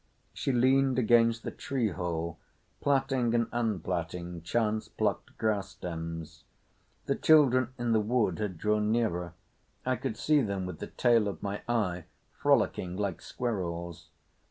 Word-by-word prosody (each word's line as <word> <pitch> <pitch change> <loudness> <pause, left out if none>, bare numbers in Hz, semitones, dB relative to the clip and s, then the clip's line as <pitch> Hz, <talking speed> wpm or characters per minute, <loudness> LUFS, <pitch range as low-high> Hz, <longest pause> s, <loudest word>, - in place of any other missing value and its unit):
She - - -1
leaned 130 +1 +3
against 115 -1 +4
the - - -4
tree 130 -5 -1
hole 85 -2 -3 0.4
plaiting 135 -4 +2
and 115 -1 +2
unplaiting 90 -6 -2
chance 110 +4 0
plucked - - -2
grass 105 -3 0
stems. 80 -2 -6 0.6
The - - +1
children 130 -5 +4
in 120 -1 -1
the 110 - +4
wood 105 -4 +1
had 100 -5 -3
drawn 105 +3 +1
nearer. 90 -7 0 0.5
I 130 0 +1
could 110 - -4
see 150 -1 +3
them 100 -5 -2
with 90 -4 -6
the - - -5
tail 115 -4 +3
of 100 - -5
my 100 0 -3
eye 90 -8 0 0.3
frolicking 115 -9 +1
like 100 -3 -2
squirrels. 85 -7 -4
105 Hz, 140 wpm, -30 LUFS, 90-120 Hz, 0.6 s, against